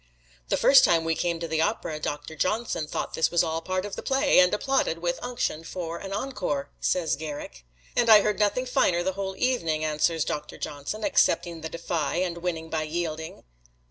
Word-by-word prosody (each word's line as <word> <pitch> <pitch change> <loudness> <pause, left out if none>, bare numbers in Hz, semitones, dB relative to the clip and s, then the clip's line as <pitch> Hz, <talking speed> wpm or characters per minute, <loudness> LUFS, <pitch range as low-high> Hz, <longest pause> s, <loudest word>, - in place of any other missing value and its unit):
"The - - +2
first 275 - +7
time 165 -1 +4
we 165 0 +1
came 170 0 -1
to 165 - -4
the 160 0 0
opera 165 -6 -1
Doctor 150 +1 -4
Johnson 185 -2 -1
thought - - -4
this 160 - +2
was 170 0 +3
all 160 -1 -1
a - - -4
part 185 +2 -2
of 205 - -5
the - - -5
play, 270 -6 +3
and 180 0 +6
applauded 240 -5 0
with 175 +1 -2
unction 245 -10 -2
for 170 -1 -5
an 195 - -7
encore," 195 - -3
says 175 -3 +1
Garrick. 145 - -7 0.3
"And 235 -1 +2
I 215 -2 +9
heard 210 +1 0
nothing 210 +5 +1
finer 175 -8 +2
the 190 +1 -1
whole 190 0 -4
evening," 165 -12 0
answers 155 +1 +1
Doctor 150 0 -4
Johnson, 150 +9 -5
accepting 170 -5 +2
the 160 - -5
defi, 170 +1 -1
and 170 -2 -3
winning 165 -2 -3
by 160 -1 -2
yielding. 160 0 -4
170 Hz, 200 wpm, -26 LUFS, 160-200 Hz, 0.3 s, I